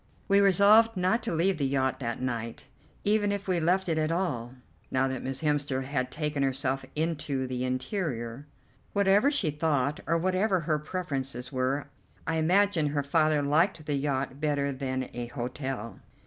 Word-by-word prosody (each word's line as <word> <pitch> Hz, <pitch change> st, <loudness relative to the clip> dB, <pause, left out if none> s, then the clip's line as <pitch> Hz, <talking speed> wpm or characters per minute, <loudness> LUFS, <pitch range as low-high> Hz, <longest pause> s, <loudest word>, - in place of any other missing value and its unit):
We 200 Hz, 0 st, +5 dB
resolved 200 Hz, +3 st, +5 dB
not 185 Hz, +6 st, +2 dB
to -, -, -3 dB
leave 170 Hz, +1 st, +1 dB
the 140 Hz, -, +1 dB
yacht 130 Hz, -1 st, 0 dB
that 120 Hz, -3 st, -3 dB
night, 115 Hz, -2 st, -4 dB, 0.4 s
even 205 Hz, 0 st, +2 dB
if 200 Hz, -1 st, -3 dB
we 180 Hz, -2 st, +1 dB
left 180 Hz, +4 st, +1 dB
it 160 Hz, -2 st, +1 dB
at 155 Hz, +1 st, 0 dB
all, 130 Hz, -9 st, -2 dB, 0.3 s
now 130 Hz, 0 st, +1 dB
that 130 Hz, -1 st, -3 dB
Miss 135 Hz, +3 st, -4 dB
Hemster 145 Hz, -3 st, 0 dB
had 130 Hz, -1 st, -2 dB
taken 150 Hz, 0 st, -2 dB
herself 135 Hz, 0 st, 0 dB
into 150 Hz, -4 st, -1 dB
the 125 Hz, -1 st, -3 dB
interior. 130 Hz, -, -3 dB, 0.5 s
Whatever 200 Hz, +6 st, +4 dB
she 245 Hz, -, 0 dB
thought, 150 Hz, -2 st, 0 dB
or 165 Hz, +1 st, +2 dB
whatever 185 Hz, +2 st, +1 dB
her 155 Hz, -1 st, 0 dB
preferences 135 Hz, -7 st, -4 dB
were, 130 Hz, +2 st, -1 dB, 0.4 s
I 165 Hz, -, 0 dB
imagine 175 Hz, 0 st, +3 dB
her 145 Hz, 0 st, -1 dB
father 155 Hz, 0 st, +2 dB
liked 155 Hz, +3 st, +2 dB
the 150 Hz, -, -1 dB
yacht 140 Hz, -1 st, -2 dB
better 145 Hz, -2 st, 0 dB
than 130 Hz, -1 st, -3 dB
a 120 Hz, 0 st, -4 dB
hotel. 125 Hz, -2 st, -5 dB
150 Hz, 165 wpm, -28 LUFS, 130-180 Hz, 0.5 s, We